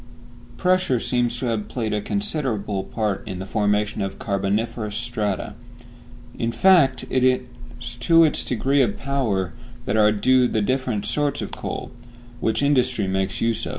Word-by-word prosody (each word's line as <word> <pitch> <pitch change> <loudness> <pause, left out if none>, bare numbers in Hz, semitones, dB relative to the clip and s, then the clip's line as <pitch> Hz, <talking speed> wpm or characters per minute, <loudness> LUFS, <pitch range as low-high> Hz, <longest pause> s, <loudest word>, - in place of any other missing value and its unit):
Pressure 180 -8 +2
seems 120 0 0
to 125 - -3
have 110 -3 -1
played 110 -2 -3
a 105 - 0
considerable 125 - -2
part 105 -4 -2
in 95 - -5
the 95 - -5
formation 105 +1 0
of 95 0 -3
carboniferous 105 +2 -2
strata. 110 -4 -2 0.8
In 115 0 -1
fact, 145 -7 +4
it 130 - +2
is 125 -2 -2
to 165 +8 +5
its 155 - +2
degree 135 +4 +1
of 105 -5 +1
power 110 - -1 0.3
that 105 - 0
are 105 -1 +5
due 125 +4 +3
the 110 -3 0
different 125 -4 -1
sorts 145 +6 0
of - - -5
coal, - - -5
of 120 0 -21
which 110 +5 0
industry 130 -6 +2
makes 95 0 -1
use. 115 -1 0
115 Hz, 155 wpm, -23 LUFS, 105-130 Hz, 0.8 s, to